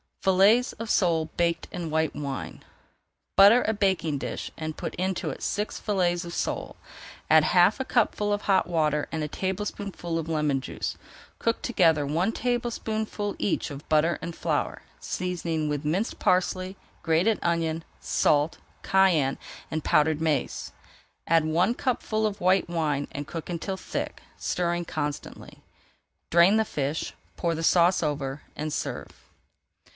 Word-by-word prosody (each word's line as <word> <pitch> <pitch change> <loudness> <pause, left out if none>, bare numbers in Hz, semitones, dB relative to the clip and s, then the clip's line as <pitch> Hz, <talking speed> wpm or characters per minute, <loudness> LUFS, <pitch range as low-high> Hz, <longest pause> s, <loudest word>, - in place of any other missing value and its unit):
FILLETS 200 +6 +4
OF 230 0 -7
SOLE 165 -4 +2
BAKED 170 -1 +1
IN 175 -2 -4
WHITE 160 0 0
WINE 140 -2 -5 0.7
Butter 205 +5 +8
a 220 - +2
baking 190 -7 +1
dish - - -5
and 155 -1 -5
put - - -4
into 185 +1 -1
it - - -9
six 210 +1 -2
fillets 180 -4 0
of 170 - -7
sole. - - -3 0.5
Add 155 0 +7
half 180 - +4
a 265 - -2
cupful 210 -4 +1
of 205 - -2
hot 195 -2 +3
water 155 -3 +1
and 160 -1 -2
a - - -1
tablespoonful 190 -1 -3
of 165 0 -5
lemon 150 -4 +1
juice. - - -4 0.4
Cook 230 0 0
together 165 - +3
one 165 +9 +1
tablespoonful 220 -4 -2
each 195 - -1
of 140 +1 -9
butter 155 +2 +3
and 170 0 -5
flour, - - -2 0.2
seasoning 170 -4 -2
with 145 0 -2
minced 185 +10 -1
parsley, 185 +1 +1 0.3
grated 170 +7 +2
onion, 165 -1 0 0.2
salt, 150 +2 +2 0.3
cayenne, 185 -8 +3 0.3
and 155 -1 -2
powdered 155 +1 +3
mace. 155 -3 -1 0.6
Add 165 -1 +4
one 175 +8 +2
cupful 220 -3 -1
of 205 -1 -6
white 185 0 +3
wine 150 -4 -1
and 145 +1 -5
cook 165 0 -6
until 180 +3 -3
thick, - - -5 0.2
stirring 175 -1 -1
constantly. 150 -2 -5 0.7
Drain 175 +5 +6
the 220 - +2
fish, 145 -3 -3 0.2
pour 170 -1 0
the 165 - -4
sauce 175 +1 +4
over, 140 -2 -2
and 155 +1 -3
serve. - - -3
170 Hz, 145 wpm, -26 LUFS, 155-195 Hz, 0.7 s, Butter